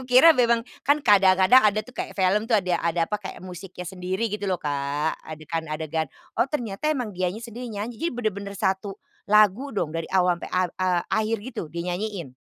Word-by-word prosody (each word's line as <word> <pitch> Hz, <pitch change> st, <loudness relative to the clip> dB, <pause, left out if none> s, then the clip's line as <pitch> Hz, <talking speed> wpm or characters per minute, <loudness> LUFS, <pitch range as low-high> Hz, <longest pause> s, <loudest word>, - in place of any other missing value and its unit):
aku -, -, -8 dB
kira 260 Hz, +6 st, +8 dB
memang 235 Hz, -3 st, +2 dB, 0.2 s
kan 290 Hz, +2 st, +3 dB
kadang-kadang 195 Hz, +4 st, +6 dB
ada 210 Hz, 0 st, +3 dB
tuh, 250 Hz, -, -14 dB
kayak -, -, -4 dB
film 195 Hz, +2 st, +2 dB
tuh, 225 Hz, -, +4 dB
ada 185 Hz, -3 st, 0 dB
ada, 170 Hz, 0 st, +1 dB
apa, 210 Hz, -, 0 dB
kayak 195 Hz, -, -8 dB
musiknya 180 Hz, 0 st, -8 dB
sendiri 190 Hz, +4 st, -2 dB
gitu 210 Hz, -1 st, -3 dB
loh, 185 Hz, -, +1 dB
Kak, 145 Hz, +1 st, -1 dB
adegan-adegan, 160 Hz, 0 st, -4 dB, 0.3 s
oh, -, -, +6 dB
ternyata 245 Hz, -2 st, -2 dB
emang 245 Hz, -8 st, -3 dB
dianya 185 Hz, +3 st, -2 dB
sendiri 240 Hz, +1 st, -7 dB
nyanyi, 215 Hz, +3 st, -5 dB
jadi 335 Hz, -, +1 dB
bener-bener 200 Hz, -4 st, -3 dB
1 190 Hz, +1 st, -1 dB, 0.3 s
lagu 210 Hz, +5 st, +4 dB
dong, 170 Hz, -8 st, -2 dB
dari 165 Hz, -1 st, -4 dB
awal 180 Hz, -2 st, +3 dB
sampai -, -, -6 dB
ak 185 Hz, -1 st, +1 dB
e 185 Hz, -, +2 dB, 0.3 s
akhir 220 Hz, +1 st, +1 dB
gitu 255 Hz, -, -5 dB
dia 170 Hz, +1 st, -3 dB
nyanyiin? 180 Hz, -7 st, -4 dB
195 Hz, 195 wpm, -25 LUFS, 175-225 Hz, 0.3 s, kira